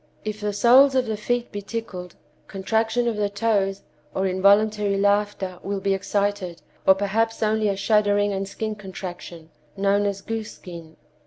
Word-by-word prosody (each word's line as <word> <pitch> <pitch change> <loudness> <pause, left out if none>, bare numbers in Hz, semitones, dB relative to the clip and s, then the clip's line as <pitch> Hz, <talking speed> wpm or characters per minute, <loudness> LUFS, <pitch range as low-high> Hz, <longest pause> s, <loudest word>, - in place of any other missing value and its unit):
If 215 0 -4
the 210 0 -1
soles 260 +6 +5
of 255 -1 +2
the 220 -1 -2
feet 240 +3 -2
be 205 - -5
tickled, 195 -5 -6 0.3
contraction 225 +4 0
of 230 -2 -1
the 205 -1 0
toes, 200 -2 0 0.3
or 190 - 0
involuntary 200 +2 +3
laughter, 200 -2 0
will 200 0 -3
be 195 0 0
excited, 200 -2 -2 0.3
or 190 - +8
perhaps 220 +4 0
only 215 0 +1
a 200 - 0
shuddering 205 0 +2
and 195 0 -3
skin 215 +2 -4
contraction, 180 -4 -9 0.3
known 200 +1 +2
as 200 -1 -3
goose 225 +1 -5
skin. 170 -3 -11
205 Hz, 160 wpm, -23 LUFS, 195-215 Hz, 0.3 s, or